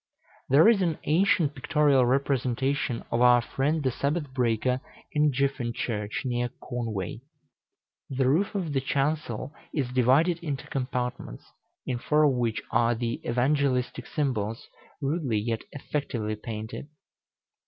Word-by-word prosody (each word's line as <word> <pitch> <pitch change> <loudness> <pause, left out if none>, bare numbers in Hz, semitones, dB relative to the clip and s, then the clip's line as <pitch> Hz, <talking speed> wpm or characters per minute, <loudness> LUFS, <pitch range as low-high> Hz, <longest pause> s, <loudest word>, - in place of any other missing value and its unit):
There 145 +9 +7
is 225 -4 +5
an 170 -4 +1
ancient 160 -2 +3
pictorial 140 -2 +3
representation 135 -1 0
of 120 - +1
our 125 0 +7
friend 145 +6 -1
the 130 - +1
Sabbath 145 +2 -2
breaker 125 0 +1 0.3
in 150 0 +3
Gyffyn 135 -3 -1
Church, 105 0 -3
near 120 -1 0
Conway. 110 -5 -4 0.9
The 130 -1 +1
roof 175 +10 +2
of 175 -7 -2
the 135 - +1
chancel 140 -1 -1 0.2
is 135 -5 0
divided 140 +8 +3
into 150 -5 -4
compartments, 125 - -4 0.4
in 125 -2 -2
four 150 +5 +3
of 150 - +5
which 120 -3 -1
are 120 0 +3
the 115 0 -3
Evangelistic 125 +1 0
symbols, 115 -7 -2 0.4
rudely, 140 -5 0
yet 110 +2 -1
effectively 125 -7 -3
painted. 110 +4 -6
130 Hz, 130 wpm, -27 LUFS, 120-145 Hz, 0.9 s, There